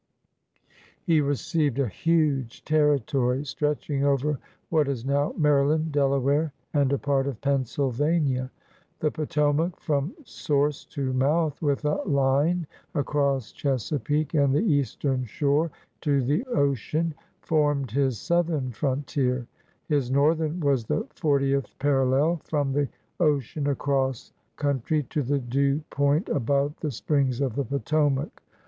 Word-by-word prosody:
He 165 Hz, -4 st, +3 dB
received 145 Hz, 0 st, 0 dB
a 140 Hz, -2 st, +1 dB
huge 145 Hz, -, 0 dB
territory, 140 Hz, -3 st, +2 dB
stretching 145 Hz, 0 st, -1 dB
over 140 Hz, 0 st, +1 dB, 0.3 s
what 155 Hz, -3 st, +2 dB
is 130 Hz, -4 st, -3 dB
now 140 Hz, +1 st, +1 dB
Maryland, 150 Hz, +1 st, +2 dB
Delaware, 140 Hz, +1 st, +1 dB, 0.2 s
and 140 Hz, -2 st, +2 dB
a 140 Hz, -, +2 dB
part 140 Hz, -1 st, 0 dB
of 130 Hz, -6 st, -4 dB
Pennsylvania. 135 Hz, +1 st, 0 dB, 0.5 s
The 155 Hz, -, +1 dB
Potomac, 150 Hz, +2 st, 0 dB
from 145 Hz, +3 st, -1 dB
source 145 Hz, -, -1 dB
tomouth, 140 Hz, +3 st, 0 dB
with 145 Hz, -1 st, 0 dB
a 150 Hz, -, +1 dB
line 145 Hz, +5 st, +2 dB, 0.3 s
across 140 Hz, -4 st, 0 dB
Chesapeake 145 Hz, +2 st, -1 dB
and 140 Hz, -3 st, +3 dB
the 175 Hz, -, +2 dB
Eastern 140 Hz, -, 0 dB
Shore 145 Hz, +7 st, +1 dB, 0.3 s
to 140 Hz, -4 st, +2 dB
the 150 Hz, -, 0 dB
ocean 155 Hz, -, 0 dB, 0.3 s
farmed 145 Hz, -5 st, +1 dB
his 135 Hz, -2 st, +1 dB
southern 160 Hz, -, 0 dB
frontia*; 130 Hz, -1 st, -1 dB, 0.4 s
his 145 Hz, -5 st, +1 dB
northern 155 Hz, +4 st, +2 dB
was 140 Hz, -5 st, +2 dB
the -, -, -1 dB
fortieth 140 Hz, -3 st, 0 dB
parallel, 140 Hz, +3 st, +2 dB
from 145 Hz, -3 st, -1 dB
the 145 Hz, 0 st, +1 dB, 0.3 s
ocean 145 Hz, -3 st, +1 dB
across 135 Hz, -3 st, -1 dB, 0.2 s
country 145 Hz, +1 st, 0 dB
to 150 Hz, -, 0 dB
the 140 Hz, +2 st, 0 dB
due 140 Hz, +3 st, 0 dB
point 145 Hz, +6 st, +1 dB
above 140 Hz, +1 st, +1 dB
the 155 Hz, -, -2 dB
springs 135 Hz, 0 st, 0 dB
of 135 Hz, -5 st, 0 dB
the 140 Hz, +3 st, -1 dB
Potomac. 140 Hz, +2 st, 0 dB
140 Hz, 125 wpm, -26 LUFS, 135-150 Hz, 0.5 s, He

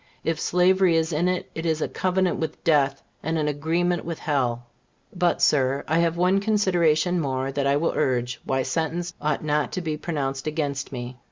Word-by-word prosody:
If 165 Hz, -1 st, -1 dB
slavery 180 Hz, 0 st, +3 dB
is 160 Hz, 0 st, +1 dB
in 165 Hz, +4 st, +1 dB
it, 180 Hz, 0 st, -1 dB
it 160 Hz, -, -5 dB
is 160 Hz, -2 st, 0 dB
"a -, -, -1 dB
covenant 185 Hz, -1 st, 0 dB
with 160 Hz, -1 st, -4 dB
death, 140 Hz, -4 st, +2 dB, 0.2 s
and 160 Hz, +2 st, -1 dB
an 150 Hz, -1 st, 0 dB
agreement 165 Hz, +4 st, 0 dB
with 165 Hz, -1 st, -4 dB
hell." 125 Hz, -5 st, -1 dB, 0.5 s
But, 175 Hz, -1 st, +1 dB
Sir, 135 Hz, -1 st, +3 dB
I 160 Hz, +2 st, +2 dB
have 170 Hz, 0 st, +1 dB
one 180 Hz, +3 st, +3 dB
consideration 180 Hz, -5 st, +2 dB
more 135 Hz, -1 st, -2 dB
that 140 Hz, 0 st, -1 dB
I 140 Hz, -, +3 dB
will 165 Hz, +3 st, 0 dB
urge 125 Hz, -4 st, 0 dB
why 130 Hz, 0 st, 0 dB
sentence 170 Hz, +3 st, -2 dB
ought 150 Hz, -1 st, -1 dB
not 150 Hz, -1 st, 0 dB
to 185 Hz, -, -2 dB
be 155 Hz, -3 st, -3 dB
pronounced 140 Hz, -4 st, -3 dB
against 145 Hz, -3 st, -2 dB
me. 125 Hz, -1 st, -6 dB
160 Hz, 190 wpm, -24 LUFS, 140-175 Hz, 0.5 s, slavery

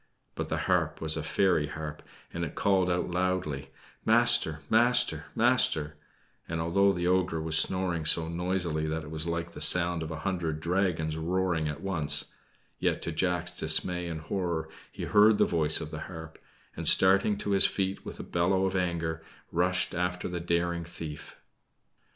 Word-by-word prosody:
But -, -, -5 dB
the -, -, -1 dB
harp -, -, 0 dB
was 80 Hz, -1 st, +1 dB
a 80 Hz, -, -3 dB
fairy 80 Hz, -1 st, +1 dB
harp, 75 Hz, 0 st, -7 dB, 0.3 s
and 85 Hz, -, -3 dB
it 80 Hz, -, -5 dB
called 95 Hz, -2 st, +2 dB
out 90 Hz, 0 st, -1 dB
loudly: 90 Hz, -7 st, -2 dB, 0.3 s
"Master, 80 Hz, 0 st, +3 dB
master, 120 Hz, -8 st, +3 dB
master;" 110 Hz, -11 st, +2 dB, 0.5 s
and, 85 Hz, 0 st, -3 dB
although 100 Hz, +5 st, +2 dB
the 85 Hz, -2 st, -3 dB
ogre 90 Hz, -2 st, +1 dB
was 80 Hz, 0 st, -1 dB
snoring 85 Hz, -1 st, +2 dB
so 80 Hz, +1 st, +4 dB
noisily 85 Hz, -2 st, -2 dB
that 80 Hz, 0 st, -3 dB
it 75 Hz, -, -10 dB
was 80 Hz, +1 st, -3 dB
like 85 Hz, 0 st, -3 dB
the -, -, -10 dB
sound 85 Hz, -1 st, +3 dB
of 80 Hz, -, -5 dB
a 80 Hz, -1 st, -6 dB
hundred 85 Hz, -5 st, -2 dB
dragons 85 Hz, -2 st, -1 dB
roaring 85 Hz, -1 st, -1 dB
at 75 Hz, -, -5 dB
once, 80 Hz, -7 st, 0 dB, 0.5 s
yet -, -, -1 dB
to 85 Hz, -, -3 dB
Jack's 90 Hz, +1 st, -1 dB
dismay 90 Hz, +3 st, 0 dB
and 80 Hz, -2 st, -5 dB
horror 85 Hz, -2 st, -3 dB, 0.2 s
he -, -, -7 dB
heard 105 Hz, +1 st, +5 dB
the -, -, +4 dB
voice 80 Hz, -2 st, +2 dB
of 80 Hz, -1 st, -7 dB
his 80 Hz, -, -6 dB
harp, 80 Hz, -3 st, -9 dB, 0.4 s
and, -, -, -1 dB
starting 100 Hz, +2 st, +5 dB
to 100 Hz, -, -3 dB
his 100 Hz, -1 st, +6 dB
feet 95 Hz, 0 st, -3 dB
with -, -, -9 dB
a -, -, -5 dB
bellow 95 Hz, +3 st, 0 dB
of 95 Hz, 0 st, -2 dB
anger, 85 Hz, -3 st, -2 dB, 0.3 s
rushed 90 Hz, +3 st, +1 dB
after 90 Hz, 0 st, -2 dB
the 90 Hz, -1 st, -4 dB
daring 85 Hz, 0 st, -1 dB
thief. 80 Hz, -2 st, -9 dB
85 Hz, 175 wpm, -28 LUFS, 80-95 Hz, 0.5 s, his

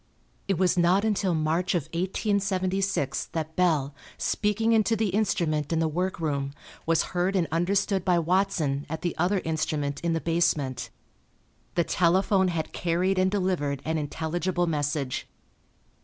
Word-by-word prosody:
It 195 Hz, -3 st, +1 dB
was 180 Hz, 0 st, +2 dB
not 180 Hz, +4 st, +3 dB
until 195 Hz, -5 st, +1 dB
March 160 Hz, +4 st, 0 dB
of 170 Hz, -, +1 dB
1876 190 Hz, -, 0 dB
that 160 Hz, -1 st, -3 dB
Bell, 155 Hz, -6 st, +2 dB, 0.2 s
speaking 220 Hz, +2 st, 0 dB
into 225 Hz, 0 st, +3 dB
the 220 Hz, -1 st, 0 dB
instrument 170 Hz, -7 st, 0 dB
in 165 Hz, -, +1 dB
the 160 Hz, 0 st, +2 dB
workroom, 155 Hz, -5 st, -2 dB, 0.3 s
was 165 Hz, -1 st, +3 dB
heard 180 Hz, +2 st, +1 dB
and 175 Hz, -4 st, +2 dB
understood 190 Hz, +3 st, +1 dB
by 180 Hz, -2 st, +3 dB
Watson 170 Hz, -5 st, 0 dB
at 160 Hz, +1 st, -5 dB
the 175 Hz, -, -1 dB
other 185 Hz, +3 st, +2 dB
instrument 155 Hz, -3 st, -1 dB
in 170 Hz, -1 st, 0 dB
the 165 Hz, -, 0 dB
basement. 140 Hz, -8 st, 0 dB, 0.9 s
The 170 Hz, -, +3 dB
telephone 190 Hz, +3 st, +2 dB
had 165 Hz, -3 st, -3 dB
carried 180 Hz, +3 st, 0 dB
and 185 Hz, 0 st, +3 dB
delivered 180 Hz, -8 st, -1 dB
an 160 Hz, 0 st, 0 dB
intelligible 175 Hz, +4 st, -1 dB
message. 145 Hz, -4 st, -2 dB
175 Hz, 140 wpm, -27 LUFS, 155-190 Hz, 0.9 s, not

